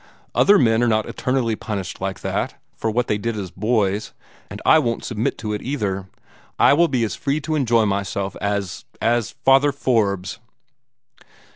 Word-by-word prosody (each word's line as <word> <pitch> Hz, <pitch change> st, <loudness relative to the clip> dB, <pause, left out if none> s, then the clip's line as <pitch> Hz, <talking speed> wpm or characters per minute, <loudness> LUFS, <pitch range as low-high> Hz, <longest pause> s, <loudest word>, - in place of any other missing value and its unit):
Other 205 Hz, +1 st, +5 dB
men 115 Hz, -5 st, +3 dB
are 120 Hz, -, +3 dB
not 110 Hz, -1 st, +2 dB
eternally 125 Hz, -3 st, -1 dB
punished 100 Hz, -5 st, -5 dB
like 95 Hz, 0 st, -3 dB
that, -, -, -2 dB, 0.2 s
for 110 Hz, -, -2 dB
what 120 Hz, +2 st, 0 dB
they 105 Hz, -, -1 dB
did 115 Hz, +1 st, -2 dB
as 95 Hz, -4 st, -5 dB
boys, 105 Hz, 0 st, 0 dB, 0.4 s
and -, -, -7 dB
I -, -, +7 dB
won't 115 Hz, -1 st, -2 dB
submit 115 Hz, -2 st, -2 dB
to 105 Hz, -2 st, -4 dB
it 105 Hz, -, -3 dB
either. 100 Hz, -8 st, -3 dB, 0.5 s
I -, -, +6 dB
will 170 Hz, +4 st, +4 dB
be 130 Hz, -6 st, 0 dB
as 110 Hz, -, -1 dB
free 140 Hz, +2 st, -1 dB
to 155 Hz, -, -3 dB
enjoy 120 Hz, -7 st, +3 dB
myself 100 Hz, -1 st, -2 dB
as 100 Hz, -2 st, -2 dB
as 120 Hz, -1 st, 0 dB
Father 135 Hz, +2 st, +5 dB
Forbes." 105 Hz, -8 st, 0 dB
110 Hz, 170 wpm, -21 LUFS, 100-125 Hz, 0.5 s, I